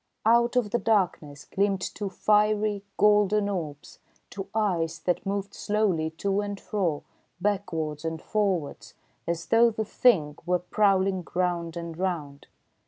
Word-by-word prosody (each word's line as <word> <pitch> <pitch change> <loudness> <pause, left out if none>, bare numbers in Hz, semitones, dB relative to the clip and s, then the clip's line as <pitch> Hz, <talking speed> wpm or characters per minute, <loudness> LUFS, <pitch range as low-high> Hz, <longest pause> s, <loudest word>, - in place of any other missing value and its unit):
Out 235 +2 +4
of 235 -5 +1
the 240 - +1
darkness 170 -9 0
gleamed 195 -1 0
two 200 +2 -4
fiery, 210 +1 +2
golden 210 0 +4
orbs, 155 -7 -5 0.3
two 195 -1 -6
eyes 180 -7 0
that 180 +1 -2
moved 200 0 -2
slowly 200 -7 0
to 195 +5 -1
and 205 -1 -5
fro, 180 -9 -2 0.4
backwards 165 -6 -2
and 160 0 -3
forwards, 190 -6 -2 0.3
as 170 -1 -2
though 235 +1 +5
the 220 -1 -3
Thing 165 -11 +2
were 180 +2 +2
prowling 190 0 +1
round 175 -2 -1
and 170 -1 -6
round. 160 -6 -4
195 Hz, 135 wpm, -27 LUFS, 165-210 Hz, 0.4 s, though